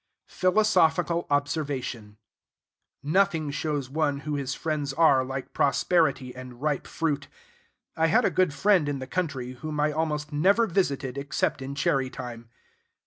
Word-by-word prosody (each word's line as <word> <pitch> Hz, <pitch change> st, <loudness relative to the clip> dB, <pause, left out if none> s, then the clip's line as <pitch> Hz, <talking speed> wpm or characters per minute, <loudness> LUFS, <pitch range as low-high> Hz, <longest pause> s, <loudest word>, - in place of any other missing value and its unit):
Philosophical 175 Hz, -4 st, +2 dB
Observation. 140 Hz, -7 st, -2 dB, 0.9 s
Nothing 160 Hz, -1 st, +1 dB
shows 145 Hz, -2 st, -2 dB
one 145 Hz, 0 st, -1 dB
who 150 Hz, +1 st, -4 dB
his 140 Hz, -2 st, -2 dB
friends 150 Hz, -4 st, -2 dB
are 140 Hz, -4 st, +4 dB
like 135 Hz, 0 st, -6 dB
prosperity 140 Hz, -2 st, +1 dB
and 125 Hz, -1 st, -10 dB
ripe 150 Hz, -1 st, -1 dB
fruit. 155 Hz, -3 st, -2 dB, 0.7 s
I 160 Hz, 0 st, +2 dB
had 160 Hz, -, +3 dB
a -, -, +2 dB
good 185 Hz, -4 st, +2 dB
friend 175 Hz, +1 st, +3 dB
in 145 Hz, -, -2 dB
the 130 Hz, -, -6 dB
country, 135 Hz, -6 st, -3 dB
whom 150 Hz, +4 st, -6 dB
I 150 Hz, +1 st, +2 dB
almost 150 Hz, -1 st, -2 dB
never 195 Hz, +10 st, +4 dB
visited 140 Hz, -, -1 dB
except 140 Hz, -1 st, -1 dB
in 135 Hz, +1 st, -5 dB
cherry 135 Hz, -2 st, +1 dB
time. 120 Hz, -3 st, -8 dB
145 Hz, 140 wpm, -26 LUFS, 135-160 Hz, 0.9 s, are